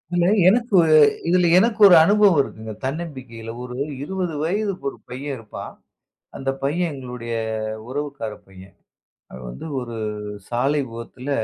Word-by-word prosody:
இல்ல 175 Hz, -1 st, +3 dB, 0.2 s
எனக்கு 235 Hz, -2 st, +2 dB, 0.5 s
இதுல 180 Hz, 0 st, +4 dB
எனக்கு 225 Hz, +3 st, +3 dB
ஒரு 180 Hz, -, +8 dB
அனுபவம் 200 Hz, -3 st, +5 dB
இருக்குங்க. 110 Hz, -4 st, -7 dB
தன்னம்பிக்கையில 130 Hz, -7 st, -6 dB
ஒரு 125 Hz, 0 st, -7 dB, 0.3 s
20 180 Hz, -1 st, -3 dB
வயது 200 Hz, +5 st, 0 dB, 0.2 s
ஒரு -, -, -11 dB
பையன் 135 Hz, +2 st, -5 dB
இருப்பான். 110 Hz, -2 st, -9 dB, 0.6 s
அந்தப் 135 Hz, 0 st, -3 dB
பையன் 170 Hz, +5 st, 0 dB
எங்களுடைய 125 Hz, -3 st, -6 dB, 0.6 s
உறவுக்கார 140 Hz, -4 st, -4 dB, 0.2 s
பையன். 95 Hz, 0 st, -15 dB, 0.6 s
அவன் 65 Hz, -1 st, -9 dB
வந்து -, -, -8 dB
ஒரு 120 Hz, -2 st, -6 dB, 0.5 s
சாலை 135 Hz, +5 st, +1 dB
விபத்துல 115 Hz, +3 st, -8 dB
140 Hz, 125 wpm, -22 LUFS, 120-175 Hz, 0.6 s, ஒரு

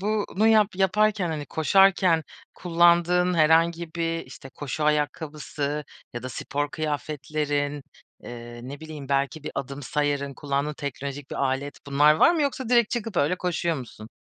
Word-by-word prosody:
bu 210 Hz, +1 st, 0 dB
bunu 215 Hz, +4 st, +3 dB
yap 215 Hz, -2 st, +5 dB
yaparken, 200 Hz, 0 st, +2 dB
hani, 150 Hz, -3 st, -4 dB
koşarken 185 Hz, 0 st, +4 dB, 0.3 s
kullandığın 175 Hz, +1 st, +3 dB
herhangi 165 Hz, +1 st, +3 dB
bir, 165 Hz, -1 st, -2 dB
işte, 135 Hz, -, -11 dB
koşu 145 Hz, +2 st, -4 dB
ayakkabısı 150 Hz, -1 st, -2 dB, 0.3 s
ya 120 Hz, -, -6 dB
da 130 Hz, -, -5 dB
spor 145 Hz, +3 st, -3 dB
kıyafetlerin, 145 Hz, -1 st, -2 dB, 0.4 s
eee, 120 Hz, 0 st, -9 dB
ne 140 Hz, +3 st, -8 dB
bileyim, 155 Hz, -3 st, -8 dB
belki 140 Hz, +2 st, 0 dB
bir -, -, -4 dB
adım 140 Hz, +1 st, -5 dB
sayarın, 140 Hz, 0 st, -1 dB
kullandığın 140 Hz, +1 st, -2 dB
teknolojik 140 Hz, 0 st, -6 dB
bir -, -, -5 dB
alet, 135 Hz, +1 st, -2 dB
bunlar 145 Hz, +2 st, +5 dB
var 250 Hz, -, +5 dB
mı 315 Hz, -, +1 dB
yoksa 265 Hz, -3 st, -2 dB
direkt 235 Hz, -3 st, +4 dB
çıkıp 225 Hz, -5 st, -3 dB
öyle 155 Hz, +5 st, +2 dB
koşuyor 170 Hz, -2 st, -1 dB
musun? 115 Hz, -4 st, -9 dB
150 Hz, 150 wpm, -25 LUFS, 140-175 Hz, 0.4 s, yap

